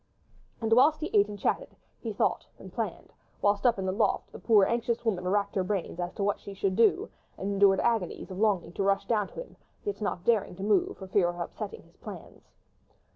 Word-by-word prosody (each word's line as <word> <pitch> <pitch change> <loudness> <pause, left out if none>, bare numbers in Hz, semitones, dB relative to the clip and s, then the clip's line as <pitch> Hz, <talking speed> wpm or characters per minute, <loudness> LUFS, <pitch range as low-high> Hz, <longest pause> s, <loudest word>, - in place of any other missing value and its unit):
And 225 0 +2
whilst 285 +6 +5
he 315 - -4
ate 205 0 +6
and 205 -1 -7
chatted, - - -1 0.2
he - - -4
thought - - 0
and - - -12
planned, - - -4 0.3
whilst, 205 +3 +2
up 235 - +3
in 190 - -3
the 185 - +1
loft, 205 +1 0
the - - -10
poor, 210 -4 +5
anxious 235 +1 -1
woman 185 -5 0
racked 200 +1 +1
her 190 - +1
brain 190 -1 -2
as 175 0 -2
to 200 - -3
what 205 0 0
she 200 - -9
should 195 -1 0
do, 225 -1 +3 0.3
and 195 +1 -3
endured 195 -1 +5
agonies 225 -5 -1
of 185 - -6
longing 205 -5 +1
to - - -3
rush 195 0 +2
down 210 -4 +1
to - - -18
him, - - -8 0.3
yet 410 - -4
not 185 -4 -2
daring 215 -6 +2
to 190 - -7
move 205 -2 +2
for 190 - -8
fear 185 -2 +2
of 175 0 -6
upsetting 450 - -6
his - - -25
plans. - - -11
205 Hz, 225 wpm, -29 LUFS, 190-225 Hz, 0.3 s, ate